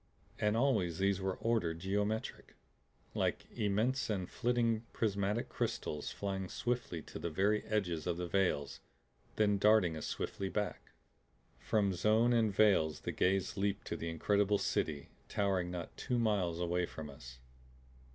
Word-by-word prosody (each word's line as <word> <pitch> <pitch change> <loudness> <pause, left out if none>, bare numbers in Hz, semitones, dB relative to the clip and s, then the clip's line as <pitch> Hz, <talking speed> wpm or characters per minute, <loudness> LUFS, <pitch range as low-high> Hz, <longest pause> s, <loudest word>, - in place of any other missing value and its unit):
And 105 +1 +2
always 100 -11 +2
these 100 0 +1
were 95 -1 -1
ordered, 110 -8 0
geometric 105 +5 -2 0.6
like - - 0
immense 110 +6 0
and 95 -4 -1
flitting 115 -1 +1
prismatic 105 +1 0
crystals 75 -1 -3
flying 95 -2 -3
swiftly 120 -10 -2
to - - -8
the 85 - -2
very 100 +6 +1
edges 90 -7 -1
of 85 -1 0
the 90 - -2
veils, 85 -6 0 0.6
then 105 -2 +3
darting 105 -5 +4
as 80 - -4
swiftly 95 -1 -3
back. 105 0 -3 0.7
From 100 -3 +1
zone 110 +6 +3
and 115 -3 +3
veils 95 -7 +3
the - - -3
gaze 95 +2 +1
leaped 100 0 -1
to - - -3
the 85 0 -4
incredible 100 +5 +2
City 95 -7 -1 0.2
towering 95 -3 0
not 90 -2 -6
two 125 - -1
miles 100 -7 +1
away 90 0 0
from 80 -1 -7
us. 65 -3 -11
100 Hz, 145 wpm, -34 LUFS, 90-105 Hz, 0.7 s, darting